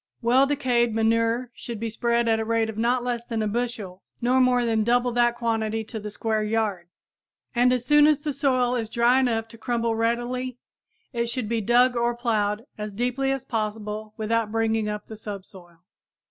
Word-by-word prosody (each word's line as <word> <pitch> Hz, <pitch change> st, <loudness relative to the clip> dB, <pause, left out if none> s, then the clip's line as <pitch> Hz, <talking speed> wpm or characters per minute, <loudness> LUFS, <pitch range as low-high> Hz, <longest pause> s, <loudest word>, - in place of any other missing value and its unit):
Well 255 Hz, +4 st, +4 dB
decayed 245 Hz, -5 st, +1 dB
manure 230 Hz, +2 st, +1 dB
should 235 Hz, -3 st, -7 dB
be 230 Hz, +1 st, -2 dB
spread 235 Hz, +1 st, 0 dB
at 225 Hz, -1 st, +3 dB
the 220 Hz, -, -2 dB
rate 225 Hz, 0 st, +1 dB
of 215 Hz, -, -12 dB
not 240 Hz, +2 st, +1 dB
less 240 Hz, -1 st, -2 dB
than 230 Hz, -2 st, -2 dB
a -, -, 0 dB
bushel 215 Hz, -5 st, -3 dB, 0.2 s
nor 255 Hz, +2 st, +3 dB
more 250 Hz, -1 st, +3 dB
than 225 Hz, -2 st, +1 dB
double 245 Hz, +2 st, +2 dB
that 240 Hz, 0 st, +2 dB
quantity 225 Hz, -2 st, -1 dB
to 220 Hz, +1 st, -7 dB
the 210 Hz, 0 st, -6 dB
square 220 Hz, +1 st, -1 dB
yard, 210 Hz, -5 st, -1 dB, 0.7 s
and 245 Hz, +1 st, +4 dB
as 250 Hz, -1 st, 0 dB
soon 295 Hz, +2 st, +6 dB
as 300 Hz, -2 st, +3 dB
the 300 Hz, -1 st, -2 dB
soil 255 Hz, -3 st, +1 dB
is 230 Hz, -3 st, -2 dB
dry 235 Hz, +3 st, +3 dB
enough 225 Hz, -3 st, 0 dB
to 230 Hz, -, -14 dB
crumble 230 Hz, -1 st, 0 dB
readily 240 Hz, +2 st, -1 dB, 0.6 s
it 235 Hz, -1 st, -1 dB
should 235 Hz, -2 st, -2 dB
be 230 Hz, 0 st, -1 dB
dug 245 Hz, +4 st, +4 dB
or 240 Hz, 0 st, +1 dB
plowed 220 Hz, -2 st, -1 dB
as 210 Hz, -1 st, -5 dB
deeply 250 Hz, +5 st, 0 dB
as 270 Hz, -2 st, -3 dB
possible 215 Hz, -1 st, -4 dB
without 220 Hz, 0 st, 0 dB
bringing 225 Hz, -1 st, 0 dB
up 210 Hz, 0 st, -5 dB
the 220 Hz, -, -9 dB
subsoil. 190 Hz, -5 st, -10 dB
230 Hz, 190 wpm, -25 LUFS, 220-245 Hz, 0.7 s, soon